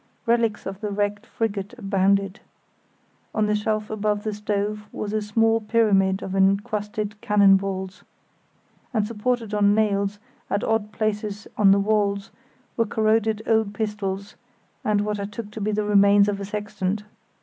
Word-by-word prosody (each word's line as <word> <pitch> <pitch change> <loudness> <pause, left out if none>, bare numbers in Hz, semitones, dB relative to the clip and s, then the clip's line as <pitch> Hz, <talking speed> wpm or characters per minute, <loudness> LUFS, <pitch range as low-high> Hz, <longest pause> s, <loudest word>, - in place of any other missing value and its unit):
Relics 230 -3 +1
of 195 +1 -6
the 210 - -2
wrecked 205 +2 -2
frigate 210 0 -3
abounded. 195 -1 +1 1.0
On 215 -1 +2
a 210 - +1
shelf 215 0 -1
above 210 -1 -1
the 215 - -2
stove 210 0 -2
was 210 0 -4
a 215 - 0
small 225 +2 +2
pyramid 205 -4 +2
of 190 - -4
encrusted 210 +1 0
cannon 205 -4 +5
balls, 190 -1 -3 0.9
and 215 -2 +2
supported 230 0 -2
on 205 0 +4
nails 200 -2 +1 0.3
at 200 - 0
odd 225 -2 0
places 210 -1 -2
on 205 -2 +5
the 200 +1 +6
walls 200 -1 0 0.5
were 230 -2 +2
corroded 220 0 +1
old 220 -2 +1
pistols, 205 -2 -3 0.5
and 210 -1 +2
what 210 0 -2
I 200 - -2
took 210 +1 -7
to 215 - -7
be 210 +1 0
the 210 0 0
remains 200 0 +5
of 200 -1 -1
a 200 - -4
sextant. 205 -1 -3
210 Hz, 155 wpm, -24 LUFS, 200-215 Hz, 1.0 s, the